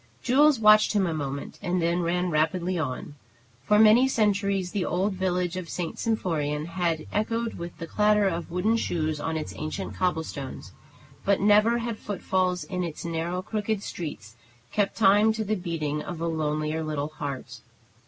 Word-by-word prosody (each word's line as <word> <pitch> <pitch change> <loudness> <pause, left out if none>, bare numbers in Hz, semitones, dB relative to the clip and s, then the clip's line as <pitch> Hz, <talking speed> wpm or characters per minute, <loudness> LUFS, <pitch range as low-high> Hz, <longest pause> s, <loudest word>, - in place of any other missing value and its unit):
Jules 285 +1 +4
watched 215 0 +6
him 200 -2 +2
a 170 - -1
moment, 140 -2 -5
and 180 +1 0
then 170 +1 +1
ran 180 +1 0
rapidly 170 +4 +1
on. 140 -1 -4 0.5
For 210 +9 +3
many 220 +4 +7
centuries 200 -6 +1
the 200 -3 -1
old 190 +4 0
village 180 -1 -1
of 185 -3 -5
St. 175 -2 -4
Symphorien 155 -9 -1
had 170 -3 -1
echoed 225 +2 -1
with 170 0 -7
the 165 - -5
clatter 210 +3 +3
of 170 -2 -3
wooden 200 +6 +1
shoes 155 -7 -1
on 160 +1 -2
its 155 - -5
ancient 155 +6 -4
cobblestones; 160 -6 -3 0.5
but 200 -1 +2
never 210 +3 +4
had 235 -2 -4
foot 205 -2 -6
falls 185 -1 +1
in 180 -1 -3
its 170 -1 -5
narrow, 170 +2 -2
crooked 210 0 -2
streets 145 - -7 0.4
kept 205 -2 0
time 210 +1 +5
to 220 0 -2
the 215 +1 -1
beating 165 -6 -2
of 175 0 -6
a 165 - -2
lonelier 155 -1 -1
little 150 -1 -2
heart. 145 -3 -6
180 Hz, 170 wpm, -26 LUFS, 160-210 Hz, 0.5 s, many